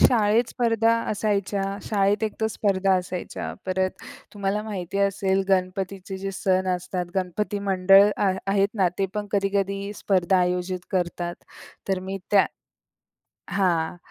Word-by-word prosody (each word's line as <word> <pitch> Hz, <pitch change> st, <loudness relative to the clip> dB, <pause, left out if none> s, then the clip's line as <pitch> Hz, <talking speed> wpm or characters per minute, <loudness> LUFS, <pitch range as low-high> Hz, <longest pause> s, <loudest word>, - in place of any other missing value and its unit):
शाळेत 225 Hz, 0 st, +4 dB
स्पर्धा 230 Hz, -1 st, +2 dB, 0.2 s
असायच्या. 200 Hz, -2 st, 0 dB, 0.2 s
शाळेत 205 Hz, 0 st, +1 dB
एक 215 Hz, -, -2 dB
तर 220 Hz, -, +2 dB
स्पर्धा 195 Hz, -2 st, +2 dB
असायच्या. 180 Hz, 0 st, -4 dB
परत 185 Hz, 0 st, +1 dB, 0.4 s
तुम्हाला 200 Hz, +1 st, -1 dB
माहिती 195 Hz, -3 st, -4 dB
असेल 195 Hz, -1 st, +1 dB
गणपतीचे 190 Hz, 0 st, -1 dB
जे 195 Hz, +1 st, -3 dB
सण 185 Hz, 0 st, +1 dB
असतात 180 Hz, 0 st, -4 dB
गणपती 195 Hz, +2 st, -1 dB
मंडळ 195 Hz, +2 st, +6 dB
आ 200 Hz, -2 st, +2 dB, 0.2 s
आहेत 195 Hz, 0 st, +3 dB
ना, 190 Hz, -4 st, +3 dB
ते 195 Hz, -, +2 dB
पण 210 Hz, -1 st, -2 dB
कधी-कधी 200 Hz, 0 st, 0 dB
स्पर्धा 190 Hz, -2 st, +2 dB
आयोजित 180 Hz, +1 st, 0 dB
करतात. 175 Hz, -1 st, -1 dB, 0.5 s
तर 190 Hz, -1 st, +1 dB
मी 190 Hz, +1 st, -5 dB
त्या 200 Hz, -2 st, +5 dB, 1.0 s
हां, 175 Hz, -4 st, +1 dB
195 Hz, 130 wpm, -25 LUFS, 185-205 Hz, 1.0 s, मंडळ